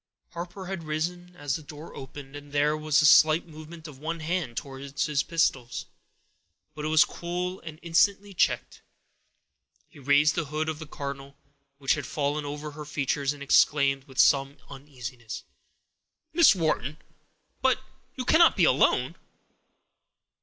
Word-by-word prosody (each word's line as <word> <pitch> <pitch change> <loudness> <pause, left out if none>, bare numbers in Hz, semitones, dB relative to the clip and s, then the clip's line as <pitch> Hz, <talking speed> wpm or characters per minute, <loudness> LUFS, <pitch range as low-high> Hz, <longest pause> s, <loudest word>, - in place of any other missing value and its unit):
Harper 175 +2 -7
had 190 -1 -5
risen 175 +3 -4
as 145 -4 -2
the - - -11
door 150 +2 -11
opened, 135 +1 -10
and 145 0 -10
there 145 +1 +2
was 155 -1 +2
a - - +4
slight 155 +2 +6
movement 160 0 -11
of 140 -4 -12
one 165 +3 -4
hand 160 -7 -3
towards 135 +1 -4
his 150 -2 +1
pistols; 135 -7 -1 0.9
but 150 0 -7
it - - -1
was 155 0 +5
cool 180 +2 -4
and 155 -1 -9
instantly 195 +4 +2
checked. - - 0 1.1
He - - -17
raised 145 +3 +4
the 170 -3 -2
hood 155 +2 -2
of 155 -1 -4
the 160 - -8
cardinal, 140 -1 -7 0.4
which 135 -1 +2
had 150 -4 -4
fallen 150 -1 -2
over 150 +1 -5
her 150 +1 -8
features, 140 -1 -1
and 145 -1 -8
exclaimed, 140 -1 +3
with 130 -3 -16
some 140 0 +4
uneasiness,— 125 -4 -8 0.9
"Miss 330 - +6
Wharton! 155 - -1 0.6
But - - +3 0.4
you 255 - -4
cannot 330 +5 +5
be - - +4
alone?" - - +2
150 Hz, 150 wpm, -27 LUFS, 140-165 Hz, 1.1 s, slight